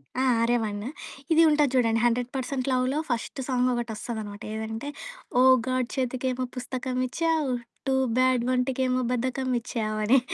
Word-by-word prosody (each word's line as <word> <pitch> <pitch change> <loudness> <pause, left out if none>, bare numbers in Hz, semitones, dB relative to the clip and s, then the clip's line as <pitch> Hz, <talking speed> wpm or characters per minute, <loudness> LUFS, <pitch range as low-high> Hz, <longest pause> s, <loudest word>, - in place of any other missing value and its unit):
ఆ! 260 - 0 0.2
'ఆర్య' 240 +1 +3
వన్ను. 210 +3 -3 0.4
ఇది 325 +1 +6
ఉంటుంది 295 -3 +3
చూడండి, 230 -2 +3
'100% 250 +2 -1
లవ్‌'లో, 255 +3 +1
ఫస్ట్ 240 +3 -3
సాంగొకటోస్తదనమాట, 235 -4 -2
ఏదంటే, 220 +5 -4 0.5
ఓ! - - +6 0.3
గాడ్ 255 -1 0
చేతికేమో 255 0 -1
పుస్తకమిచ్చావు, 255 +4 -1 0.4
టూ 265 - +2 0.2
బ్యాడ్ 255 -2 +3
వంటికేమో 255 0 +1
బద్ధకమిచ్చావు 245 -3 -1
అని. 265 +5 +6
255 Hz, 115 wpm, -26 LUFS, 235-260 Hz, 0.5 s, ఇది